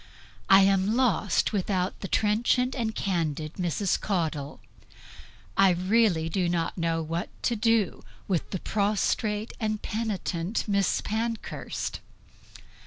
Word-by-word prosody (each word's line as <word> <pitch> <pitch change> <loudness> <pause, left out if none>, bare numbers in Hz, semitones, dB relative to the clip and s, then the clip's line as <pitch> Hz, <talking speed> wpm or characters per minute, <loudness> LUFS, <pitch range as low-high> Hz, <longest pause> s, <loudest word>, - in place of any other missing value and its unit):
I 195 0 +8
am 195 +2 +3
lost 225 -6 +2
without 190 -2 -1
the 195 - -5
trenchant 235 +6 +2
and 225 -4 -2
candid 160 -5 -2
Mrs. 180 +1 0
Caudle. 160 -7 -2 1.0
I 195 -1 +6
really 185 -2 +2
do 175 +1 0
not 170 -1 -1
know 165 -2 0
what 165 +2 -3
to 240 - +1
do 220 -3 +1 0.2
with 180 -5 -1
the 190 - -2
prostrate 210 +2 0
and 215 -1 -1
penitent 205 -4 -2
Miss 200 -2 +1
Pankhurst. 225 +1 -3
195 Hz, 115 wpm, -27 LUFS, 175-215 Hz, 1.0 s, I